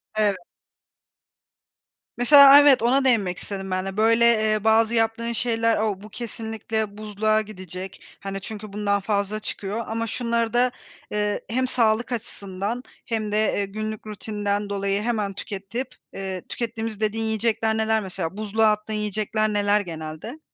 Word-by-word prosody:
Evet. 210 -3 +2 1.8
Mesela, 280 +4 +8
aaa, 285 +1 +11
evet, 285 -5 +6
ona 265 +3 +3
değinmek 200 -9 +2
istedim 195 0 -6
ben 185 +1 -1
de. 195 +1 -5
Böyle, 230 +2 +4 0.3
eee, 215 -1 0
bazı 225 +1 +4
yaptığın 225 +1 0
şeyler, 230 -1 +1
o 210 -3 -1
"Bu, 215 - -11
kesinlikle 220 -2 -4
buzluğa 215 +1 +1
gidecek, 185 -2 -8 0.2
hani, 195 0 -5
çünkü 210 0 -8
bundan 200 -1 +1
fazla 205 +1 -1
çıkıyor. 210 +2 -4
Ama 230 +1 -2
şunları 235 0 -1
da, 245 +1 +3 0.4
eee, 210 0 -1
hem 255 +3 0
sağlık 235 -1 +1
açısından 205 0 -4 0.2
hem 215 -2 -2
de, 210 - +1
eee, 210 -1 +1
günlük 215 +2 -5
rutinden 205 -1 -3
dolayı 200 0 -1
hemen 215 -3 -1
tüketip, 205 +7 -6 0.2
eee, 190 -1 -4
tükettiğimiz..." 225 -2 -4
dediğin 220 +1 -1
yiyecekler 220 0 0
neler 220 0 +2
mesela? 190 -1 -5
Buzluğa 215 +1 +2
attığın 210 +1 -3
yiyecekler 215 +1 -1
neler 205 0 +2
genelde? 160 - -7
215 Hz, 145 wpm, -24 LUFS, 200-225 Hz, 1.8 s, aaa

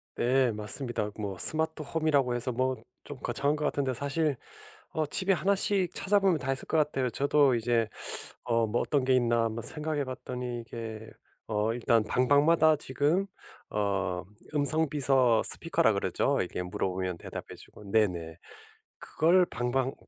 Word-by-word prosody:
네. 130 0 +2
맞습니다. 105 +1 -2
뭐 100 -3 -5
스마트 160 - +4
홈이라고 145 -4 0
해서 120 +1 -2
뭐 130 +2 -1 0.3
좀 145 - -8
거창한 145 +2 0
것 150 - -5
같은데 135 -2 -1
사실 145 +2 -1 0.6
어 155 -1 -1
집에 185 +6 +3
하나씩 190 +1 +1
찾아보면 195 -3 +2
다 135 -1 -3
있을 - - -5
것 - - 0
같아요. 140 -4 0
저도 140 +1 +2
이제 115 -1 0 0.6
어 115 -2 0
'뭐 110 +3 -1
어떤 140 -4 0
게 130 0 +3
있나.' 120 -2 +2
한번 115 0 -4
생각해봤더니 130 -5 -3
이게 110 -1 -8 0.4
어 105 +1 -1
일단 115 -1 +1
방방마다 145 +7 +3
지금 150 +7 0 0.5
어 100 -3 -2 0.3
음성 155 +2 +5
비서 130 -5 +3
스피커라고 - - +3
그러죠? - - 0
이게 - - -5
물어보면 90 0 -3
대답해 - - -9
주고 - - -14
네네. 90 -7 0 0.6
그걸 175 +3 +2
방방 125 +3 -2
130 Hz, 310 characters per minute, -28 LUFS, 115-150 Hz, 0.6 s, 음성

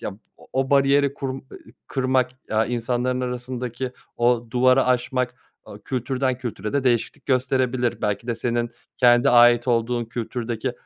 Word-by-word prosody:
ya - - -4 0.3
o - - -17
o 135 0 0
bariyeri 140 0 +3
kur 135 -1 -4
ııı, 130 +1 -5 0.5
kırmak, 130 -1 +1 0.2
aaa, 110 +1 +2
insanların 125 +1 -1
arasındaki 125 0 -4 0.2
o 120 0 +2
duvarı 130 +2 +4
aşmak, 125 0 0 0.3
aaa, - - -11
kültürden 130 0 -1
kültüre 110 -4 -5
de 140 -2 0
değişiklik 120 -3 0
gösterebilir. 130 -2 0
Belki 105 +2 -1
de 120 - -1
senin 120 +1 -1 0.3
kendi 120 -1 +5
ait 120 0 +6
olduğun 120 0 +1
kültürdeki 120 +1 -4
125 Hz, 145 wpm, -23 LUFS, 120-130 Hz, 0.5 s, ait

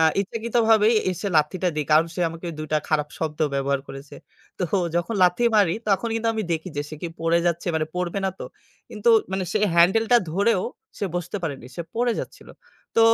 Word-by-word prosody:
আ - - +4 0.2
ইচ্ছাকৃতভাবে 225 +1 +2 0.2
এসে 185 +3 -3
লাথিটা 175 +4 +1
দেই। 150 - 0
কারণ 160 +2 +5
সে - - -4
আমাকে 165 +2 -8
২ 155 - -4
টা 155 - +4
খারাপ 150 -1 +1
শব্দ 155 -2 -3 0.2
ব্যবহার 140 0 0
করেছে। 135 +1 -10 0.4
তো - - -2 0.3
যখন 175 +6 -1
লাথি 180 +5 +3
মারি 195 -5 +4
তখন 205 +3 +1
কিন্তু 225 0 0
আমি 220 - -1
দেখি 160 +2 -3
যে 145 - 0
সে 155 - -7
কি 175 - -2
পড়ে 165 +1 +2
যাচ্ছে 170 +1 0 0.3
পড়বে 180 +2 -2
না 190 - +1
তো? - - -5 0.4
কিন্তু 210 +2 -1 0.2
মানে 190 -1 -1
সে - - +2 0.2
হ্যান্ডেলটা 220 +8 +5 0.2
ধরেও 200 +1 +2 0.4
সে - - -1
বসতে 175 +3 -4
পারেনি 140 -6 -4 0.3
পড়ে 240 0 +2
যাচ্ছিল। - - -10 0.5
তো - - +6
180 Hz, 185 wpm, -24 LUFS, 160-215 Hz, 0.5 s, তো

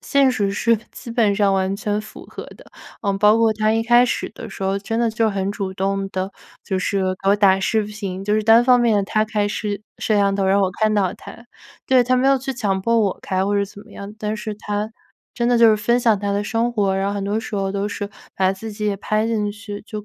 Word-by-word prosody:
现 275 -2 +3
实 205 -5 0
是， 230 +3 +2
基 - - -11
本 225 -4 +2
上 200 -2 +3
完 190 0 0
全 210 -1 -2
符 215 - -12
合 - - -9
的。 - - -17 0.3
呃， 200 -2 0
包 210 +2 +5
括 225 -1 +3
他 215 0 +1
一 225 - +1
开 240 +1 +5
始 - - -2
的 225 - -9
时 195 - -6
候， 195 +1 0
真 225 +3 -3
的 235 -1 +2
就 220 0 +1
很 195 0 -2
主 195 -2 -4
动 195 +1 -2
地 190 +1 -3 0.3
就 190 - -2
是 195 +1 -1 0.2
给 195 - +3
我 205 - +4
打 195 -2 +4
视 215 +2 +1
频， 200 -3 -6
就 210 +1 +1
是 215 - +1
单 225 +2 +6
方 250 -1 +5
面 215 -4 +2
他 215 +2 +1
开 210 -1 -1
视 205 -1 -3 0.2
摄 215 - +1
像 200 -1 +2
头 195 -1 0
让 195 +1 +3
我 190 - +2
看 215 0 +3
到 195 -3 +1
他。 235 - -13 0.4
对， 260 -1 +5
他 255 +1 +1
没 255 - +2
有 275 0 +5
去 270 +1 -4
强 205 -6 -1
迫 230 +1 +2
我 200 -4 0
开 190 0 -1
或 205 0 +1
者 200 - +2
怎 200 0 -13
么 225 - -17
样， 200 +1 -8
但 215 0 -3
是 215 +1 -5
他 210 0 -3 0.4
真 235 0 -1
的 245 - +3
就 230 -1 +6
是 215 - +3
分 235 +4 +1
享 225 -4 +3
他 200 0 -2
的 205 +1 0
生 230 +2 -1
活， 200 -4 +1
然 195 +1 0
后 200 - -1
很 200 - -3
多 205 +2 -1
时 225 - -6
候 195 -1 -1
都 200 +1 -2
是 205 0 -5 0.2
把 190 0 +2
自 215 +3 -8
己 210 0 -5
也 200 -1 0
拍 215 +2 -1
进 210 -2 -1
去， 205 -1 -8
就 210 -1 -7
210 Hz, 280 characters per minute, -21 LUFS, 195-225 Hz, 0.4 s, 单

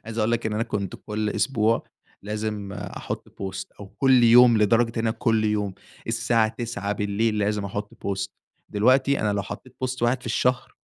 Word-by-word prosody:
عايز 115 +1 -6
اقول 110 +1 +2
لك، 115 - 0
إن 110 - -2
أنا 110 +2 0
كنت 100 -4 -3
كُلّ 105 0 -1
أسبوع 115 -3 +1 0.4
لازم 105 -1 -4
أحط 100 - -6
Post 95 -1 -6
أو 100 - -7
كل 130 +2 +3
يوم 120 -1 +7
لدرجة 115 +3 +4
إن 115 - 0
أنا - - +2
كل 115 -1 +1
يوم 105 -2 0 0.3
الساعة 115 -1 +2
21:00 110 -3 -4
بالليل، 105 +2 0
لازم 105 0 0
احط 105 +1 -5
Post 100 0 -3 0.4
دلوقتي 130 +6 +3
أنا 105 -1 +1
لو 100 -1 -1
حطيت 130 +5 -9
Post 130 -1 -3
واحد 120 +2 +2
في - - -11
الشهر 125 +2 0
110 Hz, 180 wpm, -24 LUFS, 105-115 Hz, 0.4 s, يوم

